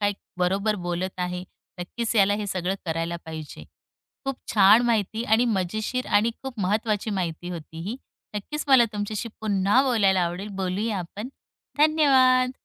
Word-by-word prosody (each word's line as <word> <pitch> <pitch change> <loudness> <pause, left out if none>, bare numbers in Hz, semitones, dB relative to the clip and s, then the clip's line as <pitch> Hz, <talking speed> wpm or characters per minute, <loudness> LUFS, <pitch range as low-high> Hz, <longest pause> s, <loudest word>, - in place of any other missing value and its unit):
काय 205 0 +2 0.3
बरोबर 195 +4 +1
बोलत 180 +2 -3
आहे. 180 0 -2 0.4
नक्कीच, 230 +6 -3
याला 200 0 +5
हे 210 0 -3
सगळं 185 0 -1
करायला 165 +1 -2
पाहिजे. 160 -2 -8 0.6
खूप 270 -1 -2 0.2
छान 210 +3 +7
माहिती 225 0 0
आणि 220 +2 +3
मजेशीर 215 +4 -1
आणि 210 +3 +3
खूप 255 -5 -6
महत्वाची 210 +2 0
माहिती 175 -2 -3
होती 165 -1 -8
ही. 240 - -3 0.4
नक्कीच, 300 +9 -4
मला 260 -3 +7
तुमच्याशी 210 +2 -3
पुन्हा 205 +4 +3
बोलायला 200 -8 +3
आवडेल. 180 +4 -4
बोलूया 195 +3 -1
आपण. 200 +7 -6 0.5
धन्यवाद. 265 -5 +5
205 Hz, 140 wpm, -25 LUFS, 180-235 Hz, 0.6 s, छान